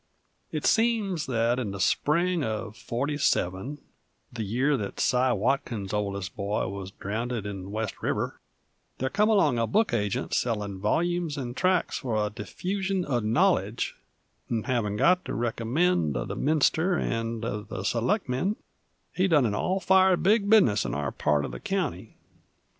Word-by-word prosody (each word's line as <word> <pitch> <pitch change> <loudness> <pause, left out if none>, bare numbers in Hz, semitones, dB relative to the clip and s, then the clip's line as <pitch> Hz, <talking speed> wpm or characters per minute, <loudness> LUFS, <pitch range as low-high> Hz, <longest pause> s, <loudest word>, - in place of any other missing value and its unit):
It - - -3
seems 220 -8 +2
that 120 0 +1
in 115 -5 -2
the 100 0 -6
spring 170 - +2
uv 110 -5 -3
'47 125 -2 -1 0.6
the 115 -2 -3
year 125 +8 +1
that 105 -6 -4
Cy 125 0 +3
Watson's 110 -3 -1
oldest 100 -2 -2
boy 100 0 -1
wuz 95 0 -5
drownded 110 +2 -3
in 95 -2 -6
West 110 -1 -4
River - - -2 0.6
there 130 +1 -2
come 210 +2 +3
along 155 - +3
a 115 - +1
book 215 - +2
agent 105 -3 -1
sellin' 105 -5 -1
volyumes 170 - 0
'nd 120 -2 -5
tracks 185 +6 +1
f'r 110 -5 -1
the 105 0 -4
diffusion 190 - -2
uv 120 -5 0
knowledge, 110 +2 +1 0.6
'nd 115 -2 -1
havin' 115 -6 0
got 180 - +4
the - - -5
recommend 115 - +1
of - - -4
the - - -3
minister 160 +4 +2
'nd 115 0 -2
uv 105 -1 -4
the 95 - -5
selectmen, 130 - 0 0.6
he 185 +1 +2
done 150 -7 +4
an 105 - 0
all 185 - 0
fired 190 -1 +4
big 205 +1 +3
business 125 - +5
in - - -3
our 70 -1 -2
part 75 -1 +1
uv - - -6
the 60 - -7
county. - - -3
120 Hz, 160 wpm, -27 LUFS, 105-175 Hz, 0.6 s, business